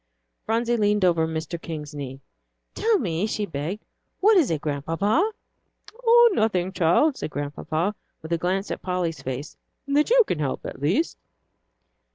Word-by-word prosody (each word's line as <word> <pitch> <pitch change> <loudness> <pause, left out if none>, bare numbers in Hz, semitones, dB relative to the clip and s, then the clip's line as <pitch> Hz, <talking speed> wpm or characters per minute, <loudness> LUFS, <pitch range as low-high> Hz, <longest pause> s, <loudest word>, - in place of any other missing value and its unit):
Phronsie 235 +2 +1
leaned 210 -2 +2
over 165 -2 +3
Mr. 160 +1 -4
King's 155 -2 -6
knee. 135 -2 -7 0.5
"Tell 450 -1 +2
me," 180 - -1
she 215 -1 -2
begged, 165 +5 -5 0.3
"what 425 +3 +5
is 340 -8 +4
it, 160 - 0
Grandpapa?" 165 - 0 0.7
"Oh, 475 0 +7
nothing, 190 - +1
child," 185 - +3
said - - -4
Grandpapa, 155 +6 -2 0.3
with 160 +1 -3
a - - +2
glance 190 +3 -1
at - - -4
Polly's 175 -5 -2
face, 135 +2 -5 0.3
"that 290 +4 +2
you - - +6
can 160 - -2
help, 140 -3 -2
at - - -7
least." 185 - 0
180 Hz, 155 wpm, -24 LUFS, 155-225 Hz, 0.7 s, Oh